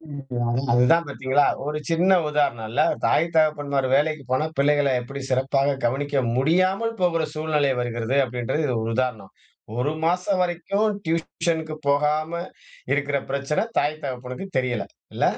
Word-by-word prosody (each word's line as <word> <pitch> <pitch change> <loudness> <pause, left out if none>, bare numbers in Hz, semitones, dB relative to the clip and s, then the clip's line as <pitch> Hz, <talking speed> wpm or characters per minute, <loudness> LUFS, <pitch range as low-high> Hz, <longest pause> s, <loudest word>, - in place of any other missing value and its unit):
அதான் 135 -5 -3
அதுதான் 125 +8 +4
பார்த்தீங்களா? 140 +1 +1 0.2
ஒரு 150 +1 -2
சின்ன 175 +3 +3 0.2
உதாரணம்ல. 120 -7 0 0.2
தாய் 165 - +3
தகப்பன்மார் 145 -4 +2
வேலைக்கு 155 0 0
போனா 130 +4 +1
பிள்ளைகள 145 -1 +3
எப்டி 140 +3 -7
சிறப்பாக 135 +2 +1
கவனிக்க 135 +3 0
முடியாமல் 185 - +2
போகுற 165 -3 +2
சூழ்நிலை 155 -3 +1
வருகிறது? 120 +1 -2
அப்டின்றது 125 +5 -2 0.2
ஒரு 115 - -2
உதாரணம். 120 -7 -2 0.5
1 140 +5 0
மாசம் 180 +2 +1
வரைக்கும், 180 +5 0 0.2
டியூஷன்க்கு 160 -1 -1
போகாம, 150 +3 +1 0.6
இருக்கிற 145 0 0
பிரச்சன 140 +8 -1
தாய் 155 +1 -2
தகப்பனுக்கு 125 +5 -5
தெரியல. 125 -5 -1 0.3
இல்ல? - - +1
145 Hz, 125 wpm, -24 LUFS, 130-160 Hz, 0.6 s, அதுதான்